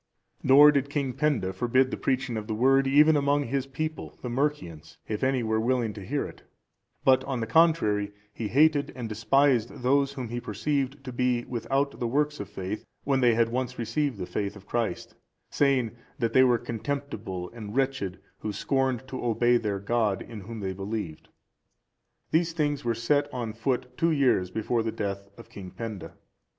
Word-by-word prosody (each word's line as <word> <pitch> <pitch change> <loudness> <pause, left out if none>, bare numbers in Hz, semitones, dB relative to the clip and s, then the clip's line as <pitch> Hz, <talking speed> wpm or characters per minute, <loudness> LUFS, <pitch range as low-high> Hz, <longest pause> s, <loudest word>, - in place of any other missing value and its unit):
Nor 145 +3 +8
did 140 -1 0
King 140 -3 -1
Penda 135 -10 0
forbid 130 +6 +2
the - - -1
preaching 130 -2 -1
of 110 -1 -4
the 110 - -2
Word 135 +4 +4
even 150 +3 +6
among 145 0 +2
his 135 +1 -2
people, 155 +4 -5
the 125 - -3
Mercians, 90 - -3
if 105 +2 -3
any 130 -2 +2
were 110 0 +1
willing 120 -1 0
to 100 - -9
hear 140 +8 -2
it; - - -11 0.6
but, 130 0 +5
on 135 -3 -2
the 115 - -1
contrary, 110 -8 +3 0.2
he 110 - -4
hated 145 +4 +3
and 120 -3 -4
despised 120 +2 +2
those 140 +2 +2
whom 130 -4 -5
he 120 +1 -4
perceived 135 +5 -2
to 130 -2 -7
be 125 -1 0
without 135 +3 -1
the 120 - -1
works 150 +4 0
of 100 - -6
faith, 95 +3 -5 0.2
when 135 -1 +1
they 120 -2 +4
had 115 0 +3
once 125 +1 -3
received 120 +2 -1
the 90 - -4
faith 100 +2 -3
of 100 -1 -13
Christ, 115 +1 -2 0.4
saying, 135 -5 +2 0.3
that 115 -5 -1
they 130 - +7
were 125 -2 +4
contemptible 115 -7 -4
and 110 -2 -8
wretched 130 -9 -1 0.2
who 105 - -3
scorned 130 +3 -1
to 130 -1 -6
obey 120 +1 +3
their 105 -4 -2
God, 105 -1 0
in 115 -3 -9
whom 110 +2 -7
they 95 -1 -2
believed. 95 -4 -5 1.0
These 165 +1 +2
things 145 -3 -1
were 115 -1 0
set 145 +5 +1
on 120 -4 -4
foot 125 +2 -2
two 165 - +3
years 130 - +2
before 110 +4 -1
the 110 0 -2
death 100 -2 -4
of - - -13
King 95 -2 -9
Penda. 105 +1 -7
120 Hz, 185 wpm, -27 LUFS, 110-140 Hz, 1.0 s, Nor